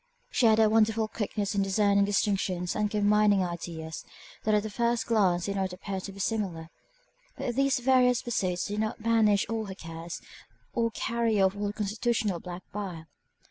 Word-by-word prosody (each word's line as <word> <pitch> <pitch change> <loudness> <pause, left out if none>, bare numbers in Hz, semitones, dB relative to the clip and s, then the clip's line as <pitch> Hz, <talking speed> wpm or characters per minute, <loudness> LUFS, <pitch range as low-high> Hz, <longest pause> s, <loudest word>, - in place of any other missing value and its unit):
She 240 - +3
had 220 -1 +5
a 220 -1 +5
wonderful 220 0 +3
quickness 210 -2 -3
in 200 - +1
discerning 200 +1 +3
distinctions 195 -3 0
and 210 -1 0
combining 210 -1 +3
ideas, 165 -2 -5 0.4
that 215 0 +3
at 210 - +2
the 215 - -4
first 235 +2 0
glance 190 -6 +2
did 200 -1 -2
not 190 -1 -1
appear 190 +1 -5
to 195 - -7
be 195 - -12
similar. 190 -6 -2 0.7
But 240 - -2
these 275 +1 +2
various 250 -1 +3
pursuits 185 -7 -1
did 205 +1 -3
not 215 0 -2
banish 220 -3 +3
all 225 -1 -2
her 190 -2 -7
cares, 165 -1 -7 0.5
or 230 -1 +1
carry 230 -1 0
off 190 0 +3
all 205 0 -2
her - - -2
constitutional 215 -2 -1
black 180 +1 -8
bile. 185 -6 -5
205 Hz, 180 wpm, -28 LUFS, 190-225 Hz, 0.7 s, had